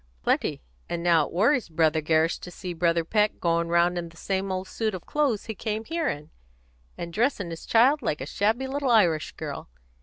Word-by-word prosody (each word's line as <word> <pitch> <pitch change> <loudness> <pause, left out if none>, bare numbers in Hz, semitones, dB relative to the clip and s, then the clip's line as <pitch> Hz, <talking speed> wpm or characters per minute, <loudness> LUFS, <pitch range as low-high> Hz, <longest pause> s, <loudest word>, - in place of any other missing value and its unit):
"Plenty. - - 0 0.3
And 170 0 -3
now 165 -3 +4
it - - -13
worries 235 - +2
Brother 160 -1 +2
Gerrish 160 +2 +2
to - - -9
see 180 0 -6
Brother 170 0 +1
Peck 210 +3 +1
going 170 0 +1
round 170 +1 +2
in 170 -1 -6
the 165 - -19
same 195 +1 -2
old 185 0 -3
suit 220 -1 -2
of 180 - -9
clothes 280 -8 0
he 220 - -4
came 215 +1 -3
here 330 +1 -1
in, 145 +1 -6 0.7
and 170 -1 -6
dressing 210 -5 0
his 165 - -8
child 260 +6 +4
like 155 -10 -1
a 135 - -4
shabby 220 - 0
little 275 0 -2
Irish 175 -10 +3
girl. - - -7
180 Hz, 205 wpm, -26 LUFS, 165-225 Hz, 0.7 s, now